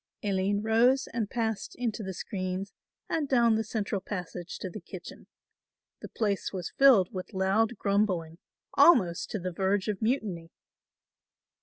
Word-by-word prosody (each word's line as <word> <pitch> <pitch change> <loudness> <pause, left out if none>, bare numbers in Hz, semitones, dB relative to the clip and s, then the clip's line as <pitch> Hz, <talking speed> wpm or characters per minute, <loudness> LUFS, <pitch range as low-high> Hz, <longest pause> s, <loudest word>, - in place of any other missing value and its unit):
Aline 200 0 0
rose 240 +5 +3
and 230 -3 -3
passed 225 -3 -2
into 230 -3 -2
the 190 -2 -5
screens 185 0 -4 0.3
and 300 -4 -1
down 235 -3 +4
the 220 0 +1
central 210 -3 -2
passage 180 -3 -6
to - - -5
the 185 +3 -8
kitchen. 175 +1 -10 0.7
The - - -9
place 205 -3 -1
was 180 -3 -5
filled 250 -10 +6
with 185 +2 -6
loud 205 +5 +1
grumbling, 190 -6 0 0.3
almost 185 - +5
to - - -2
the 185 0 -3
verge 190 +3 0
of 210 -3 -2
mutiny. 215 -8 -1
200 Hz, 145 wpm, -29 LUFS, 185-225 Hz, 0.7 s, filled